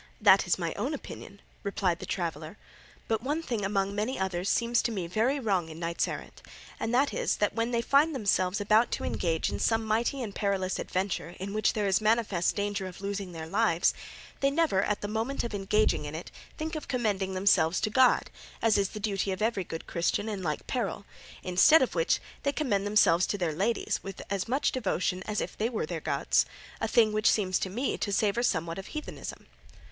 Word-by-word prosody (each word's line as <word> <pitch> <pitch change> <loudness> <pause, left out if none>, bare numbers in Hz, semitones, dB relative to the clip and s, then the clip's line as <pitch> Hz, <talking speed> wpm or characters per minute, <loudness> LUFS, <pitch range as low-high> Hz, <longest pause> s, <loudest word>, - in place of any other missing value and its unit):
"That - - +6
is - - +2
my - - -2
own - - -2
opinion," - - -10 0.2
replied 190 -4 -1
the - - -7
traveller; 165 0 -4 0.5
"but 220 -1 0
one 295 +6 -2
thing 235 -8 -2
among 195 0 0
many 215 +6 -2
others 190 -1 -1
seems 235 0 +2
to 235 - -1
me 190 -6 -3
very 225 +11 +1
wrong 195 -9 0
in 160 - -9
knights 170 0 -1
errant, - - -7 0.4
and 230 - -2
that 270 +4 +2
is - - 0
that 210 - 0
when 230 +1 0
they 235 -1 0
find 290 +4 +3
themselves 200 -4 +1
about 215 +3 +4
to - - -2
engage 165 -3 -1
in - - -3
some 225 -1 +1
mighty 235 +5 0
and 210 -4 -6
perilous 195 -3 -1
adventure 185 -2 -2
in 195 +2 -5
which 215 0 +2
there 210 -2 -1
is 195 +1 +2
manifest 215 -5 +2
danger 205 -2 -2
of 180 0 -10
losing 200 -2 -4
their 165 -2 -6
lives, 190 -1 +2 0.5
they 275 - +3
never 285 -9 +2
at 210 +1 -1
the 205 - -3
moment 225 +6 -2
of 235 - -4
engaging 205 +2 +1
in - - -6
it - - -7 0.3
think 315 +1 -4
of 310 - -5
commending 205 -7 -1
themselves 185 -3 +3
to 215 - 0
God, 260 +2 +4 0.3
as 220 -3 +3
is 195 -1 +1
the 215 - -7
duty 200 -2 -1
of 185 - -3
every 220 -4 +1
good 165 -1 -7
Christian 175 +5 -1
in 205 -3 -3
like 155 -4 -3
peril; 215 -5 -3 0.4
instead 190 - +6
of 255 - -2
which 165 -2 +2 0.2
they 280 - +1
commend 210 -10 0
themselves 185 -4 +4
to 205 - -1
their 175 -5 -1
ladies 205 +9 0
with 195 -1 -7
as 195 +1 -1
much 265 +5 +1
devotion 185 -6 -1
as 210 - -1
if - - -5
these 220 +2 0
were 225 -9 -2
their 165 0 -5
gods, - - +1 0.3
a - - 0
thing 220 -1 +4
which 215 +1 +3
seems 185 -4 +2
to 190 - -2
me 245 +8 -2
to 200 - -2
savour 205 +3 +1
somewhat 170 -6 0
of 195 - -8
heathenism." 305 -1 -7
205 Hz, 210 wpm, -29 LUFS, 185-230 Hz, 0.5 s, That